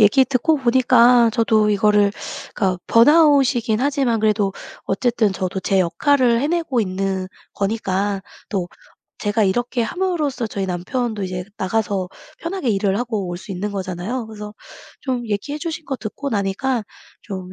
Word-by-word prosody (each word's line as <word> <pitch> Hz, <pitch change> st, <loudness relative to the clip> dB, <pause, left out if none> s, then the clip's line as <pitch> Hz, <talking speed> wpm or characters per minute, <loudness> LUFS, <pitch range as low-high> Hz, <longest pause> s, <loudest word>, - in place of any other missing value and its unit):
얘기 240 Hz, +6 st, +6 dB
듣고 280 Hz, +5 st, +1 dB
보니까 245 Hz, -2 st, +5 dB
저도 220 Hz, -2 st, +3 dB
이거를 205 Hz, 0 st, +3 dB, 0.4 s
그니까 185 Hz, -3 st, 0 dB
번아웃이긴 260 Hz, -4 st, +4 dB
하지만 270 Hz, -5 st, +1 dB
그래도 210 Hz, -2 st, +2 dB, 0.3 s
어쨌든 220 Hz, 0 st, +1 dB
저도 190 Hz, +1 st, -3 dB
제 195 Hz, 0 st, +2 dB
역할을 245 Hz, -, +2 dB
해내고 300 Hz, -5 st, 0 dB
있는 190 Hz, -1 st, -2 dB, 0.3 s
거니까 200 Hz, -1 st, -1 dB, 0.3 s
또 185 Hz, -4 st, -2 dB, 0.5 s
제가 210 Hz, +1 st, 0 dB
이렇게 240 Hz, +5 st, 0 dB
함으로써 305 Hz, -5 st, -1 dB
저희 200 Hz, -2 st, -3 dB
남편도 205 Hz, +4 st, -2 dB
이제 180 Hz, -1 st, -4 dB
나가서 195 Hz, -2 st, -1 dB, 0.3 s
편하게 335 Hz, -6 st, -3 dB
일을 195 Hz, -1 st, +1 dB
하고 225 Hz, -6 st, -2 dB
올 175 Hz, -, -4 dB
수 190 Hz, -, -11 dB
있는 200 Hz, +2 st, -3 dB
거잖아요. 195 Hz, +5 st, -4 dB
그래서 210 Hz, -1 st, -8 dB, 0.5 s
좀 250 Hz, -3 st, -3 dB
얘기해 285 Hz, +9 st, -3 dB
주신 320 Hz, -1 st, -5 dB
거 270 Hz, -1 st, -3 dB
듣고 260 Hz, +6 st, -5 dB
나니까 215 Hz, +4 st, -1 dB, 0.4 s
좀 185 Hz, -2 st, -7 dB
220 Hz, 320 characters per minute, -20 LUFS, 195-255 Hz, 0.5 s, 얘기